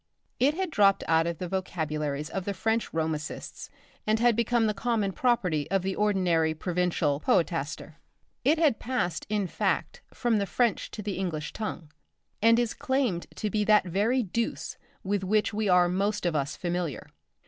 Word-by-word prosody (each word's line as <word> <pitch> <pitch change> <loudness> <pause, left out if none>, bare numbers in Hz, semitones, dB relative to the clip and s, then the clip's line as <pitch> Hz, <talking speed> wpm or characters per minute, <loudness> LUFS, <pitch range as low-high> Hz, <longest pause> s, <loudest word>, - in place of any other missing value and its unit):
It 280 +5 +3
had 375 -1 -2
dropped 200 -6 +4
out 165 0 +3
of 170 -1 -3
the 180 - -4
vocabularies 155 -5 -3
of 190 -2 -3
the 200 - -2
French 225 +4 0
romancists 160 -2 -4 0.4
and 215 +1 +3
had 240 -1 +4
become 235 0 +2
the 215 - +1
common 215 -2 0
property 190 - 0
of 195 -2 +1
the 190 0 -2
ordinary 180 -6 +2
provincial 175 -4 0
poetaster. 160 -2 -1 0.4
It 295 +6 +4
had 305 -8 +3
passed 180 - -2
in 210 -2 0
fact 485 - -1
from 235 -3 +1
the 200 - -1
French 235 -2 0
to 210 - -7
the 200 -2 -3
English 160 -5 -3
tongue, 175 -8 -5 0.5
and 230 +1 +6
is 240 -2 +1
claimed 260 -10 -1
to 210 - -3
be 210 +1 +1
that 210 -2 +5
very 210 +8 +1
deuce 230 +4 -3 0.3
with 200 0 -1
which 210 +3 +1
we 210 -1 0
are 180 -1 +5
most 200 +3 -1
of 170 -2 +1
us 140 -1 -1
familiar. 175 -4 -3
195 Hz, 170 wpm, -28 LUFS, 170-225 Hz, 0.5 s, and